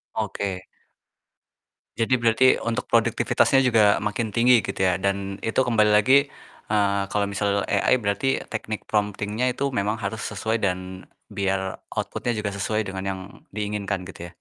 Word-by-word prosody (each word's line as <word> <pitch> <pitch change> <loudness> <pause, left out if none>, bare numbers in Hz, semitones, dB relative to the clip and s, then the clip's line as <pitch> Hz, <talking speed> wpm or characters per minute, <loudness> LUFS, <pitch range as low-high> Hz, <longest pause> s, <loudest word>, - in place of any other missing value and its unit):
Oke. 100 -3 -3 1.4
Jadi 115 +2 +1
berarti 115 +2 +3 0.2
untuk 115 +2 -2
produktivitasnya 120 +3 +3
juga 110 -4 +4
makin 105 +2 -2
tinggi 115 +2 +4
gitu - - -5
ya, 95 -1 +1
dan 100 0 -2
itu 115 - -3
kembali 110 -3 +3
lagi, 130 +7 +5 0.4
eee, 100 -2 +2
kalau 105 -1 0
misal 100 0 -1
AI 100 +5 +2
berarti 110 +4 -1
teknik 110 -1 -5
prompting-nya 105 +3 -1
itu 140 +2 -1
memang 105 -1 0
harus 110 0 -4
sesuai 110 +2 -2
dan 95 -1 -3 0.3
biar 95 -1 -2
output-nya 120 - -2
juga 100 -2 -3
sesuai 110 +2 -1
dengan 95 -1 -5
yang 95 - -4 0.3
diinginkan 100 -2 -3
gitu 85 -2 -9
ya? - - -18
105 Hz, 145 wpm, -24 LUFS, 100-115 Hz, 1.4 s, lagi